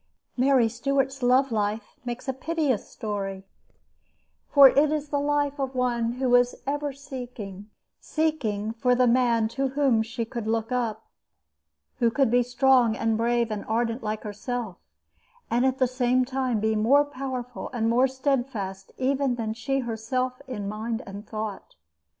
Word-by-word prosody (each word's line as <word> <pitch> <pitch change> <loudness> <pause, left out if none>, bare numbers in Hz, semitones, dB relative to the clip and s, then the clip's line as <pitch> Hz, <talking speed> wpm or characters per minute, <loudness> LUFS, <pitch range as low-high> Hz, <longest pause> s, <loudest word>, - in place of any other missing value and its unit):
Mary 260 -2 +4
Stuart's 270 +3 -1
love 255 +2 +3
life 210 0 -2
makes 245 +1 -5
a 265 - 0
piteous 295 -3 -1
story, 195 -3 -4 1.0
for 280 -2 +9
it 285 +3 +3
is 300 -1 -2
the 285 - 0
life 290 0 0
of 265 -1 -2
one 240 -2 0
who 255 +1 -1
was 245 0 +4
ever 290 +1 -1
seeking 245 -7 -8 0.3
seeking 240 -10 -1
for 250 +2 +2
the 250 0 +4
man 235 -2 +3
to 270 +4 -1
whom 265 -4 +2
she 230 +1 -3
could 230 -1 -5
look 225 +1 -1
up, 240 -4 -2 0.9
who 235 -2 +4
could 230 +1 +2
be 245 0 +5
strong 245 -1 +3
and 225 -1 +1
brave 235 0 +1
and 210 -1 -3
ardent 230 +2 -1
like 215 0 -3
herself, 215 -1 -4 0.7
and 245 +3 +3
at 260 0 0
the 260 - +3
same 255 0 +1
time 255 -3 -1
be 220 +1 +1
more 265 +7 +4
powerful 255 -3 -5
and 230 -3 -1
more 245 +3 +4
steadfast 245 -8 -2
even 265 -1 +1
than 220 -2 -3
she 270 +4 -1
herself 255 +3 -2
in 210 -6 -4
mind 225 +3 -3
and 200 +2 -9
thought. 215 - -6
245 Hz, 155 wpm, -26 LUFS, 220-265 Hz, 1.0 s, for